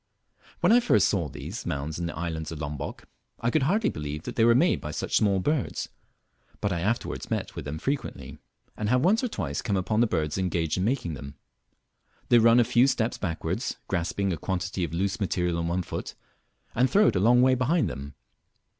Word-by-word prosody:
When -, -, +4 dB
I 240 Hz, -, +7 dB
first 240 Hz, -, +3 dB
saw 85 Hz, -7 st, 0 dB
these 75 Hz, -, -7 dB
mounds 75 Hz, 0 st, -3 dB
in 85 Hz, -, -2 dB
the 85 Hz, -, -6 dB
island 80 Hz, -1 st, -3 dB
of 80 Hz, -, -5 dB
Lombock, 75 Hz, -1 st, -5 dB, 0.3 s
I 115 Hz, -, 0 dB
could 155 Hz, -, +2 dB
hardly 195 Hz, -, +2 dB
believe 75 Hz, +1 st, -5 dB
that -, -, -6 dB
they 115 Hz, -, +3 dB
were 115 Hz, 0 st, +6 dB
made 165 Hz, +8 st, +3 dB
by 75 Hz, -, -5 dB
such 75 Hz, -, -3 dB
small 100 Hz, -2 st, +3 dB
birds, 150 Hz, +7 st, -1 dB, 0.7 s
but 100 Hz, -2 st, 0 dB
I 85 Hz, -, -2 dB
afterwards 110 Hz, +7 st, -2 dB
met -, -, -3 dB
with -, -, -6 dB
them 75 Hz, +2 st, -4 dB
frequently, 135 Hz, -, -4 dB, 0.4 s
and 105 Hz, -1 st, -2 dB
have 125 Hz, +4 st, +3 dB
once 220 Hz, +7 st, +3 dB
or -, -, +2 dB
twice 80 Hz, -, -3 dB
come 100 Hz, -, 0 dB
upon 110 Hz, +4 st, +1 dB
the 120 Hz, -, +4 dB
birds 80 Hz, -3 st, -1 dB
engaged 85 Hz, -2 st, 0 dB
in -, -, 0 dB
making 115 Hz, -, -1 dB
them. 70 Hz, 0 st, -8 dB, 0.9 s
They 120 Hz, -, +7 dB
run 115 Hz, +1 st, +6 dB
a -, -, +6 dB
few 125 Hz, +2 st, +4 dB
steps 125 Hz, -3 st, 0 dB
backwards, 85 Hz, -5 st, -3 dB
grasping 90 Hz, +3 st, -1 dB
a -, -, -3 dB
quantity 95 Hz, +2 st, -2 dB
of 80 Hz, -, -2 dB
loose 95 Hz, +4 st, -1 dB
material 90 Hz, -3 st, 0 dB
in 85 Hz, -, -1 dB
one 90 Hz, +2 st, -1 dB
foot, -, -, -6 dB, 0.6 s
and 125 Hz, +2 st, +3 dB
throw 210 Hz, +2 st, +5 dB
it -, -, -3 dB
a -, -, +2 dB
long 120 Hz, +5 st, +5 dB
way 130 Hz, 0 st, +5 dB
behind 130 Hz, +7 st, +2 dB
them. 70 Hz, +1 st, -7 dB
95 Hz, 210 wpm, -27 LUFS, 80-120 Hz, 0.9 s, I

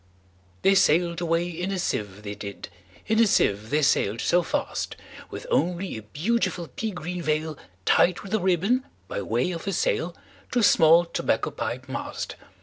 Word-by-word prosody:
They 195 Hz, -, +6 dB
sail'd 175 Hz, -2 st, +3 dB
away 170 Hz, 0 st, +1 dB
in 175 Hz, +2 st, -4 dB
a 195 Hz, -, -1 dB
sieve, 105 Hz, -, -3 dB
they 100 Hz, -1 st, -5 dB
did, 100 Hz, -1 st, -8 dB, 0.4 s
In 220 Hz, +1 st, +1 dB
a 230 Hz, -, +6 dB
sieve 105 Hz, -, +2 dB
they 150 Hz, +3 st, +2 dB
sail'd 110 Hz, -5 st, +2 dB
so 175 Hz, -, +3 dB
fast, -, -, -2 dB, 0.3 s
With -, -, -7 dB
only 180 Hz, -, 0 dB
a 110 Hz, -, -6 dB
beautiful 170 Hz, -, -1 dB
pea 220 Hz, -, -2 dB
green 180 Hz, -2 st, -5 dB
veilTied 155 Hz, -, 0 dB
with 200 Hz, 0 st, -7 dB
a 220 Hz, -, +3 dB
ribbon, 190 Hz, +8 st, +2 dB, 0.2 s
by -, -, -3 dB
way 120 Hz, -, 0 dB
of 170 Hz, +2 st, -6 dB
a 195 Hz, -, 0 dB
sail, 480 Hz, -2 st, 0 dB, 0.4 s
To -, -, +1 dB
a 240 Hz, -, +3 dB
small 165 Hz, -2 st, +6 dB
tobacco 170 Hz, -, -1 dB
pipe -, -, -4 dB
mast. -, -, -5 dB
175 Hz, 170 wpm, -25 LUFS, 145-195 Hz, 0.4 s, They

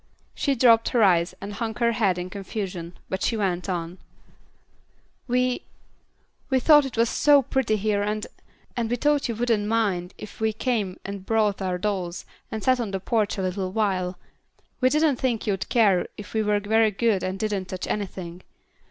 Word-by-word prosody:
She 280 Hz, -, 0 dB
dropped 230 Hz, -2 st, +5 dB
her 240 Hz, -3 st, +3 dB
eyes 175 Hz, -3 st, +3 dB
and 200 Hz, +1 st, -6 dB
hung 225 Hz, 0 st, -3 dB
her 235 Hz, 0 st, +2 dB
head 200 Hz, -6 st, +1 dB
in 180 Hz, +1 st, -5 dB
confusion, 185 Hz, -3 st, -5 dB
but 190 Hz, -, -3 dB
she 230 Hz, -, 0 dB
went 185 Hz, -2 st, -1 dB
on, 175 Hz, 0 st, -4 dB, 1.3 s
"We, 250 Hz, 0 st, +1 dB, 0.9 s
we 265 Hz, -2 st, +3 dB
thought 295 Hz, +2 st, +6 dB
it 255 Hz, -, -9 dB
was 230 Hz, +1 st, +4 dB
so 285 Hz, +3 st, +4 dB
pretty 255 Hz, -3 st, 0 dB
here, 205 Hz, 0 st, 0 dB
and 210 Hz, +1 st, -2 dB, 0.5 s
and 235 Hz, -3 st, -1 dB
we 245 Hz, -, +1 dB
thought 290 Hz, +1 st, +1 dB
you 230 Hz, -, -2 dB
wouldn't 225 Hz, -3 st, 0 dB
mind 200 Hz, -6 st, 0 dB
if 215 Hz, -, -10 dB
we 220 Hz, 0 st, +1 dB
came 215 Hz, -5 st, -2 dB
and 200 Hz, -1 st, -6 dB
brought 210 Hz, -1 st, +1 dB
our 185 Hz, -1 st, -1 dB
dolls 185 Hz, -3 st, -3 dB, 0.3 s
and 220 Hz, -2 st, -4 dB
sat 255 Hz, -1 st, +3 dB
on 230 Hz, -4 st, -2 dB
the 195 Hz, -1 st, -3 dB
porch 210 Hz, +2 st, 0 dB
a 190 Hz, -, -2 dB
little 185 Hz, 0 st, -2 dB
while; 190 Hz, -4 st, -1 dB, 0.6 s
we 255 Hz, -, +4 dB
didn't 300 Hz, -1 st, +2 dB
think 240 Hz, -4 st, -1 dB
you'd 195 Hz, -3 st, -2 dB
care 205 Hz, -7 st, +3 dB
if 205 Hz, -, -9 dB
we 220 Hz, -, +1 dB
were 210 Hz, -1 st, +2 dB
very 220 Hz, +2 st, +3 dB
good 210 Hz, -1 st, +1 dB
and 185 Hz, +1 st, -3 dB
didn't 205 Hz, -2 st, -2 dB
touch 185 Hz, 0 st, -5 dB
anything. 185 Hz, -3 st, -4 dB
210 Hz, 185 wpm, -25 LUFS, 190-230 Hz, 1.3 s, thought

